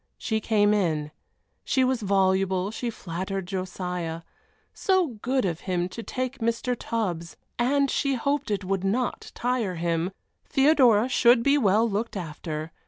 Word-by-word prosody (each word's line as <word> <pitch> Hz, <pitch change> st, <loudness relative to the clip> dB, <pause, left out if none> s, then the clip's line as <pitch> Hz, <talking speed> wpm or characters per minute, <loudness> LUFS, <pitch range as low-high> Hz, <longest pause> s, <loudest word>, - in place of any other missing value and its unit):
She 220 Hz, -1 st, -1 dB
came 210 Hz, -1 st, +3 dB
in. 155 Hz, -7 st, 0 dB, 0.5 s
She 260 Hz, -, +2 dB
was 255 Hz, -2 st, +1 dB
voluble, 190 Hz, -1 st, +1 dB
she 240 Hz, +2 st, -3 dB
flattered 190 Hz, -1 st, -4 dB
Josiah. 180 Hz, -3 st, -4 dB, 0.5 s
So 375 Hz, -4 st, +2 dB
good 260 Hz, -2 st, +1 dB
of 170 Hz, -3 st, -2 dB
him 175 Hz, -1 st, 0 dB
to 230 Hz, -, -7 dB
take 255 Hz, +3 st, -4 dB
Mr. 235 Hz, +2 st, 0 dB
Tubbs 180 Hz, -9 st, -3 dB, 0.2 s
and 275 Hz, +3 st, +3 dB
she 275 Hz, -2 st, +1 dB
hoped 280 Hz, +2 st, -1 dB
it 205 Hz, -2 st, -1 dB
would 190 Hz, 0 st, -1 dB
not 235 Hz, +6 st, -1 dB
tire 240 Hz, -6 st, -1 dB
him. 170 Hz, +1 st, 0 dB, 0.4 s
Theodora 265 Hz, -6 st, +4 dB
should 240 Hz, -2 st, +4 dB
be 280 Hz, +2 st, +4 dB
well 220 Hz, -3 st, +3 dB
looked 215 Hz, +1 st, -2 dB
after. 155 Hz, -2 st, -5 dB
205 Hz, 145 wpm, -26 LUFS, 180-250 Hz, 0.5 s, Theodora